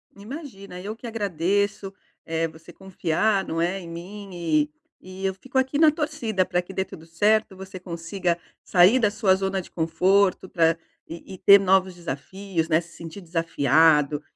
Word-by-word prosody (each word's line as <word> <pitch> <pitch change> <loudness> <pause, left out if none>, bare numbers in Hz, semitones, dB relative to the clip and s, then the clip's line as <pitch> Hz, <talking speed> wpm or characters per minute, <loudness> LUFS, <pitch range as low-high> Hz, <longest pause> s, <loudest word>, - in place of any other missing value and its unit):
Imagina, 200 - -9
eu 210 +3 -5
que 235 - -9
agradeço. 200 -1 -1 0.3
Eh, 165 0 -1
você 160 0 -14
confiar, 190 +2 0
não 165 +1 -2
é, 180 +3 0
em 175 - -10
mim 195 +5 -8
e 155 -4 +1 0.3
e 185 +1 -10
eu 190 - -1
fico 265 +7 -2
aqui 265 +2 0
na 310 0 +6
torcida 295 - -1
pra 180 -1 -1
que 180 +2 -7
dê 190 - 0
tudo 165 -3 -12
certo, 205 +5 +1
você 190 0 -9
consiga 175 0 -2 0.3
sair 185 +7 +5
da 220 -5 +2
sua 205 -3 +3
zona 190 0 -2
de - - -15
conforto 185 +3 +1
pra 165 -1 +3 0.3
e 170 +3 -9
e - - -13
ter 200 +2 +7
novos 190 -1 +2
desafios, 170 +3 -4
né, 160 0 +3
se 170 0 -16
sentir 165 +4 -9
desafiado 160 -3 +2
190 Hz, 170 wpm, -24 LUFS, 165-200 Hz, 0.3 s, ter